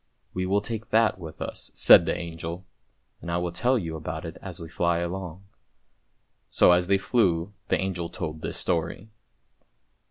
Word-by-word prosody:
" - - -45
We 95 0 -2
will 100 +2 +2
take 110 0 -5
that 110 -3 +3
with 80 -3 -9
us," - - -5
said 85 - +7
the - - 0
angel; 85 +1 -6 0.3
" - - -30
I 85 - 0
will 90 0 -2
tell 125 +9 +2
you 85 -7 -4
about 80 +1 -5
it 80 - -7
as 95 -2 -7
we 85 - -7
fly 85 +1 0
along." 90 +1 -4 1.1
So - - +5
as 90 0 +3
they 100 0 +4
flew 95 -3 +1
the - - +1
angel 90 -3 -2
told 80 0 -5
this - - -4
story. 85 +5 -2
90 Hz, 180 wpm, -26 LUFS, 85-95 Hz, 1.1 s, said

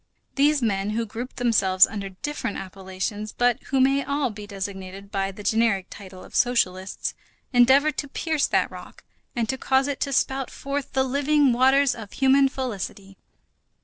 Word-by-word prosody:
These 285 -1 +3
men 200 -2 0
who 230 - 0
grouped 230 +4 -7
themselves 195 -6 +4
under 200 -3 -6
different 205 +3 -4
appellations, 195 +3 -5
but 245 -1 +1
who 270 - 0
may 275 +1 +3
all 280 -2 -1
be 210 -1 -9
designated 195 -1 -7
by 195 -1 -1
the 205 +2 -11
generic 220 -4 +2
title 190 -2 -11
of - - -15
socialists, 190 -6 0 0.4
endeavored 265 +5 +4
to 285 - -3
pierce 310 +1 -1
that - - +1
rock - - -12 0.3
and 235 -2 0
to 265 +2 -2
cause 265 +1 +2
it 285 -2 -3
to 280 - -1
spout 270 -1 0
forth 280 0 -5
the 265 - +2
living 280 0 +2
waters 265 +2 +4
of 215 -3 -10
human 270 0 +4
felicity. 200 -6 -5
240 Hz, 165 wpm, -24 LUFS, 195-270 Hz, 0.4 s, themselves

